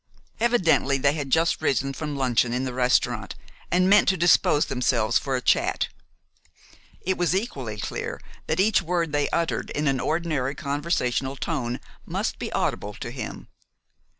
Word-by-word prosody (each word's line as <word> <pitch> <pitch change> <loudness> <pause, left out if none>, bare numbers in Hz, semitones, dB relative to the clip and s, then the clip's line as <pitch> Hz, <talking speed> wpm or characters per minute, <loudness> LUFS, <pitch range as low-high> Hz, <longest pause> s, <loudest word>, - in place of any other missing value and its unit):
Evidently, 185 - +3
they 140 +1 +2
had 145 -3 -4
just 160 +4 +2
risen 135 +1 +1
from 150 +1 -4
luncheon 120 -3 +1
in 125 +1 -1
the 130 -1 -3
restaurant, 125 0 +1 0.3
and 185 +1 +3
meant 205 +1 +6
to 190 - +3
dispose 165 -3 +4
themselves 120 -3 +1
for 135 -2 -2
a 125 - -2
chat. - - +2 1.1
It 190 0 -1
was 175 +1 +2
equally 135 - -3
clear - - -4 0.3
that 160 - 0
each 210 +2 +4
word 170 -2 -1
they 145 -1 +1
uttered 170 -1 -1
in 150 0 -1
an 135 -2 +1
ordinary 155 -5 -1
conversational 140 -2 -1
tone 130 -5 -3 0.2
must - - -3
be - - -4
audible - - -2
to - - -6
him. - - -7
145 Hz, 155 wpm, -25 LUFS, 130-170 Hz, 1.1 s, meant